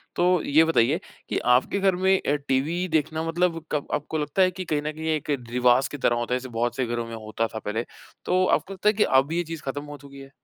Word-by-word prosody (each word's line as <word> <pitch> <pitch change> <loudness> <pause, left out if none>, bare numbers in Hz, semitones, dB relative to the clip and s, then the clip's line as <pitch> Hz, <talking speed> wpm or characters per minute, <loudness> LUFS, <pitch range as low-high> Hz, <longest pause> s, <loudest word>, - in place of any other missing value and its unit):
तो 180 -1 +3
ये 155 +3 +5
बताइए 155 0 +2 0.3
कि - - -1 0.2
आपके 130 +10 +1
घर 190 -2 +3
में 190 +1 +3
अ, 145 - +1
टीवी 145 +6 -1
देखना 160 +1 0
मतलब 165 -1 0
कब 150 -2 -1
आपको 150 +2 -2
लगता 150 +5 0
है 185 0 +4
कि 185 +1 -6
कहीं 150 -2 -1
न 155 +1 -3
कहीं 160 +1 -6
एक 150 0 -6 0.2
रिवाज़ 125 +1 +3
की 145 - -5
तरह 120 -2 +2
होता 120 +1 -2
है 125 - +1
जैसे 130 0 -9
बहुत 120 0 0
से 130 - 0
घरों 120 0 -3
में 115 - -7
होता 110 +1 -3
था 110 - -6
पहले। 110 +3 -3 0.4
तो 185 0 +2
आपको 195 - 0
लगता 195 +2 +2
है 210 - +2
कि 210 - +3
अब 135 +3 +3
ये 175 +1 0
चीज़ 165 -1 -7
ख़त्म 145 +2 -3
हो 145 0 -9
चुकी 140 0 -13
है? 135 0 -11
150 Hz, 260 wpm, -25 LUFS, 130-175 Hz, 0.4 s, ये